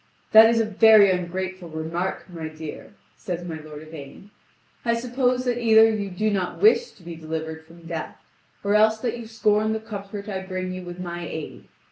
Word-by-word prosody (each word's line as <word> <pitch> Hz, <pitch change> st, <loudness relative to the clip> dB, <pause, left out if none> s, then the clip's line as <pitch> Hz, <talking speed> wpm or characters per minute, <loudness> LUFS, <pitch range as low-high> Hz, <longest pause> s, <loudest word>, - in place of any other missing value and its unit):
"That 220 Hz, +1 st, +9 dB
is 230 Hz, 0 st, +2 dB
very 215 Hz, -1 st, +6 dB
ungrateful 180 Hz, 0 st, -4 dB
remark, 160 Hz, +4 st, -4 dB
my 165 Hz, -3 st, -6 dB
dear," 155 Hz, +5 st, -9 dB, 0.2 s
says 175 Hz, -1 st, -5 dB
my 160 Hz, -2 st, -5 dB
lord 150 Hz, 0 st, -10 dB
Yvain; 155 Hz, +5 st, -11 dB, 0.5 s
"I 235 Hz, -1 st, +1 dB
suppose 250 Hz, +1 st, 0 dB
that 245 Hz, -1 st, -1 dB
either 225 Hz, -1 st, +6 dB
you 205 Hz, -2 st, -3 dB
do 215 Hz, +4 st, -1 dB
not 190 Hz, -3 st, -2 dB
wish 450 Hz, +3 st, +4 dB
to 185 Hz, -, -20 dB
be 170 Hz, 0 st, -7 dB
delivered 160 Hz, 0 st, -5 dB
from 165 Hz, 0 st, -16 dB
death, 165 Hz, -1 st, -5 dB, 0.5 s
or 200 Hz, 0 st, +1 dB
else 220 Hz, +1 st, +4 dB
that 240 Hz, -1 st, -2 dB
you 230 Hz, -, -8 dB
scorn 215 Hz, -1 st, +1 dB
the 220 Hz, -, -2 dB
comfort 200 Hz, -1 st, -7 dB
I 190 Hz, -2 st, -3 dB
bring 185 Hz, -1 st, -4 dB
you 185 Hz, -, -6 dB
with 175 Hz, 0 st, -9 dB
my 175 Hz, -1 st, -5 dB
aid. 160 Hz, -1 st, -7 dB
190 Hz, 185 wpm, -24 LUFS, 170-220 Hz, 0.5 s, That